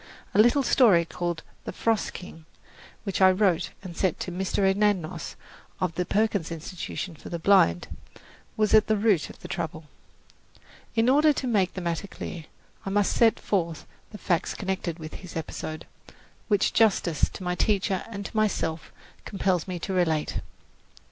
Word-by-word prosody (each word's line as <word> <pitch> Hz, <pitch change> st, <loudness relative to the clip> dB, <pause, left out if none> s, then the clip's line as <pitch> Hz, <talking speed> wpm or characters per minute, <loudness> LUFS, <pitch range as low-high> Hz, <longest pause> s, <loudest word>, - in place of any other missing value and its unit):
A -, -, +2 dB
little 240 Hz, +5 st, +4 dB
story 205 Hz, -10 st, +5 dB
called 170 Hz, -1 st, -4 dB, 0.2 s
"The -, -, -4 dB
Frost 225 Hz, -2 st, 0 dB
King," 165 Hz, -3 st, -10 dB, 0.6 s
which 195 Hz, -2 st, -2 dB
I 190 Hz, -, +8 dB
wrote 185 Hz, -3 st, +2 dB
and 180 Hz, -3 st, -8 dB
sent 185 Hz, -2 st, 0 dB
to 180 Hz, -, -3 dB
Mr. 190 Hz, +2 st, 0 dB
Anagnos, 190 Hz, -4 st, 0 dB, 0.4 s
of 180 Hz, -3 st, -1 dB
the 180 Hz, +1 st, -2 dB
Perkins 205 Hz, -5 st, 0 dB
Institution 170 Hz, +2 st, -5 dB
for -, -, -11 dB
the 170 Hz, -, -3 dB
Blind, 165 Hz, -, +4 dB, 0.7 s
was 215 Hz, -1 st, +2 dB
at 215 Hz, 0 st, +6 dB
the 215 Hz, -, +2 dB
root 200 Hz, -7 st, +2 dB
of -, -, -12 dB
the -, -, -8 dB
trouble. 165 Hz, -3 st, -4 dB, 1.1 s
In 225 Hz, +1 st, +3 dB
order 295 Hz, +4 st, +5 dB
to 275 Hz, -, -3 dB
make 205 Hz, -7 st, +1 dB
the 185 Hz, -, -4 dB
matter 170 Hz, +2 st, -2 dB
clear, 170 Hz, -4 st, -7 dB, 0.4 s
I -, -, -4 dB
must 205 Hz, 0 st, +2 dB
set 230 Hz, -2 st, +4 dB
forth 170 Hz, -6 st, -1 dB, 0.2 s
the 210 Hz, -, -9 dB
facts 175 Hz, -4 st, -1 dB
connected 190 Hz, -4 st, -3 dB
with 155 Hz, -2 st, -8 dB
this 180 Hz, -3 st, -10 dB
episode, 155 Hz, 0 st, -5 dB, 0.6 s
which 205 Hz, -3 st, +2 dB
justice 190 Hz, -8 st, +3 dB
to -, -, -9 dB
my 180 Hz, 0 st, -1 dB
teacher 195 Hz, 0 st, +1 dB
and 200 Hz, -3 st, -6 dB
to -, -, -8 dB
myself 170 Hz, -7 st, -1 dB, 0.3 s
compels 190 Hz, -4 st, -1 dB
me 180 Hz, -1 st, -3 dB
to 190 Hz, +3 st, -4 dB
relate. 160 Hz, -4 st, +1 dB
190 Hz, 165 wpm, -26 LUFS, 170-210 Hz, 1.1 s, I